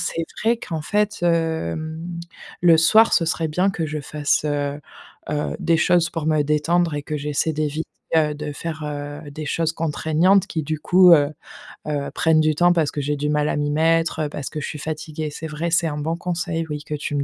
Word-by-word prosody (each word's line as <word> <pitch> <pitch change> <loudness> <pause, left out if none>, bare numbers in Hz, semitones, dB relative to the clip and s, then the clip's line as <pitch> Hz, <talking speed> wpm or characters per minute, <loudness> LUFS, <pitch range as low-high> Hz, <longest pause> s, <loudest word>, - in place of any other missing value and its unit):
c'est 165 - -2 0.2
vrai 230 +2 +3
qu'en 160 -8 -5
fait, 210 +5 0
hem, 160 - -1 0.6
le 170 -2 +7
soir 220 +8 +5
ce 165 - +4
serait 165 0 -1
bien 180 +6 +1
que 165 -4 -3
je 155 0 -4
fasse, 145 +1 -1
heu, 145 -1 -2 0.5
heu 150 0 -2
des 165 0 +2
choses 170 +1 +3
pour 165 -3 -4
me 155 -2 +3
détendre 155 +3 +1
et 145 - -3
que 155 - -3
j'essaie 150 +2 -1
d'éviter, 155 +1 -2 0.3
heu, 150 -2 +2
de 150 0 -5
faire, 155 +1 -5
heu, 145 0 -5
des 155 +2 -6
choses 165 +2 0
contraignantes 165 +4 +2
qui 160 -2 -2
du 155 +1 -2
coup, 180 +1 +6
heu 145 -2 +3 0.6
heu, 145 -2 -2
prennent 160 -1 +3
du 155 0 +2
temps 175 +2 +4
parce 160 -4 +1
que 145 - -3
j'ai 145 +1 -1
du 150 +1 -1
mal 150 0 +1
à - - 0
m'y 145 0 0
mettre, 165 +1 +2
heu, - - -3
parce 145 -2 -5
que 155 -1 -5
je - - -4
suis 150 - -6
fatiguée. 155 0 -4
C'est 160 +2 -6
vrai, 160 +2 -3
c'est 165 -1 +3
un 150 - -3
bon 160 +3 -2
conseil, 175 -2 -2
oui, 150 -1 -4
que 150 - -6
tu 145 0 -4
me 140 - +1
155 Hz, 220 wpm, -22 LUFS, 150-165 Hz, 0.6 s, le